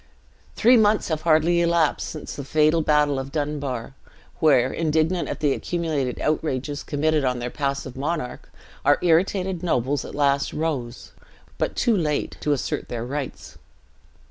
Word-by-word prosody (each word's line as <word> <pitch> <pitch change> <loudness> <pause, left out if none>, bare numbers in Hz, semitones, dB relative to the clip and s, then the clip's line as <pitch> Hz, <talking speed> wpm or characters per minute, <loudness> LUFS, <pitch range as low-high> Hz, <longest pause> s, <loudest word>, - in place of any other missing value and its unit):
"Three 245 +2 +5
months 210 -2 +3
have 155 -1 -1
hardly 170 +1 +3
elapsed 170 -2 +1
since 155 - -7
the 140 - -6
fatal 155 +3 +3
battle 150 -2 +2
of 135 +1 -6
Dunbar, 145 -5 -3 0.5
where, 135 -5 +4
indignant 160 +2 0
at - - -5
the 145 -3 +3
accumulated 155 -8 -2
outrages 145 -2 -1
committed 155 0 0
on 125 -1 0
their 120 0 -4
passive 140 -2 -3
monarch, 145 -1 -4 0.3
our - - +4
irritated 180 +1 +2
nobles 140 -4 0
at - - -8
last 140 -1 +1
rose, 140 -7 -3 0.5
but - - -1
too 235 -3 +2
late, 150 -6 -1
to 150 - 0
assert 140 - -2
their 120 -1 -4
rights. 140 +1 -6
150 Hz, 145 wpm, -23 LUFS, 140-165 Hz, 0.5 s, Three